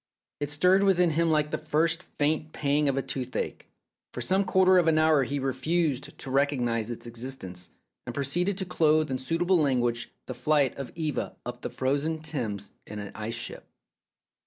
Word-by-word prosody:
It 145 -1 -2
stirred 180 +6 +4
within 180 -3 +4
him 165 +2 +2
like 150 -1 +2
the - - -1
first 160 +2 +1 0.2
faint 155 +1 0
pang 145 0 +1
of 135 - 0
a 135 - 0
toothache. 130 -2 -4 0.5
For - - -4
some 190 +1 +2
quarter 185 0 +5
of 170 - +2
an 160 -1 +4
hour 155 -2 +5
he 140 +3 -2
refused 135 +2 -1
to 130 - -7
recognize 125 -5 +1
its 120 - -6
existence, 115 -7 -5 0.4
and 120 - -5
proceeded 175 +8 0
to 190 - -2
clothe 155 -4 +2
in 130 - -1
suitable 170 +6 +2
language 120 -5 +1 0.2
the 130 - -5
flight 140 +1 +2
of 140 -2 -6
Eva 155 -3 -2
up 125 0 -6
the - - -3
frozen 145 +5 0
Thames 130 -10 -4 0.2
in 105 - -7
an 100 -1 -6
ice 110 +2 -4
ship. 120 - -6
145 Hz, 180 wpm, -28 LUFS, 130-160 Hz, 0.5 s, quarter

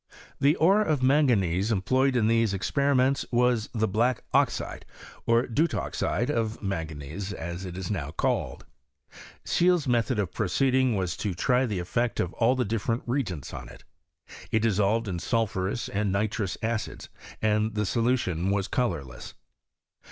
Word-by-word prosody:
The 145 +3 +4
ore 195 +6 +4
of 155 -10 0
manganese 115 - +3
employed 130 +6 +2
in 115 -3 +3
these 115 -2 +2
expe 100 +9 -4
riments 135 +1 +2
was 120 -2 +2
the 110 -2 0
hlack 115 +5 +1
oxide, - - 0 0.4
or 115 +2 +4
deutoxide, 140 -1 -1
of 115 -4 -1
man 95 -6 -3
ganese, 80 +6 -6
as 85 +1 -6
it 90 -1 -7
is 95 +1 -4
now 75 -8 -3
called. 80 - -2 0.8
Scheele's 175 -4 +2
method 120 -1 +1
of 100 -4 -1
proceeding 130 +4 +2
was 90 -4 -1
to 100 -5 -3
try 125 +6 +2
the 105 -4 -2
effect 115 +7 -1
of 90 - -1
all 120 +2 +2
the 130 - 0
different 115 +2 -1
reagents 120 - -3
on - - -7
it. - - -14 0.7
It 110 - +1
dissolved 110 +1 +2
in 90 -3 -3
sulphurous 110 0 -1
and 100 0 -1
nitrous 105 0 -1
acids, 110 -1 -3 0.3
and 110 0 +1
the 105 0 0
solution 105 -7 0
was 100 -1 0
colourless. 75 - -3
110 Hz, 150 wpm, -27 LUFS, 95-125 Hz, 0.8 s, The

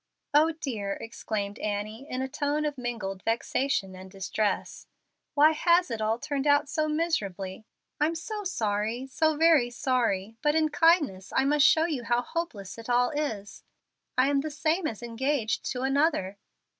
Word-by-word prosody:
"Oh 310 +3 +5
dear!" 225 -11 -3
exclaimed 210 -2 -5
Annie, 215 +6 -4
in 255 +1 -2
a - - -2
tone 290 +2 -1
of 295 -1 -1
mingled 230 -7 -4
vexation 225 -3 -1
and 185 +1 -10
distress, 200 +2 -2 0.5
"why 305 +2 +6
has 345 +2 +3
it 225 -1 -3
all 220 +1 +1
turned 285 +2 -2
out 290 +1 +4
so 310 +1 -1
miserably? 215 - -2 0.3
I'm 315 +3 +2
so 420 +6 -5
sorry, 225 - -1
so 310 +3 +1
very 315 -6 +5
sorry; 230 -5 -1
but 295 +1 +2
in 315 -1 +3
kindness 295 - +2
I 265 - +3
must 295 +1 +5
show 320 0 +4
you 295 -8 -2
how 240 +1 +1
hopeless 230 - -5
it 230 - -9
all 245 +2 +3
is. 220 -10 -4 0.5
I 255 +1 +5
am 280 -1 +2
the 310 - -4
same 315 +3 0
as 225 -2 -6
engaged 240 0 -1
to 250 0 -3
another." 265 - +1
260 Hz, 165 wpm, -28 LUFS, 215-305 Hz, 0.5 s, why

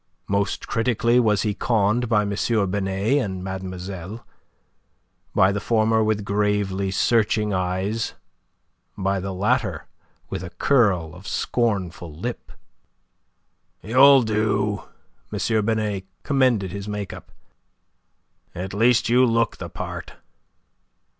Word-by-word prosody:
Most 100 0 -1
critically 120 +1 +2
was 105 -4 +2
he 105 -2 0
conned 110 +2 +1
by 105 -3 +3
M. 100 - -3 0.4
Binet 100 +7 0
and 95 -2 -5
mademoiselle; 95 +2 -6 1.1
by 95 +1 +5
the 105 - -1
former 110 0 +2
with 105 -1 0
gravely 100 -1 0
searching 105 +1 +1
eyes, 95 +4 -1 0.8
by 95 0 0
the 95 +1 -4
latter 100 - 0 0.4
with - - -5
a 90 - -6
curl 90 - +2
of 90 +3 -12
scornful 95 -8 -1
lip. 120 +9 -6 1.3
"You'll 135 +3 +6
do," 105 -3 0 0.5
M. 110 -2 0
Binet 105 -4 -1 0.2
commended 125 -9 +2
his 100 +1 -6
make 105 -2 -4
up. - - -12 1.2
"At 95 +2 -5
least 115 +3 +3
you 125 +2 +4
look 115 -2 +2
the - - -7
part." - - -7
105 Hz, 115 wpm, -23 LUFS, 95-115 Hz, 1.3 s, You'll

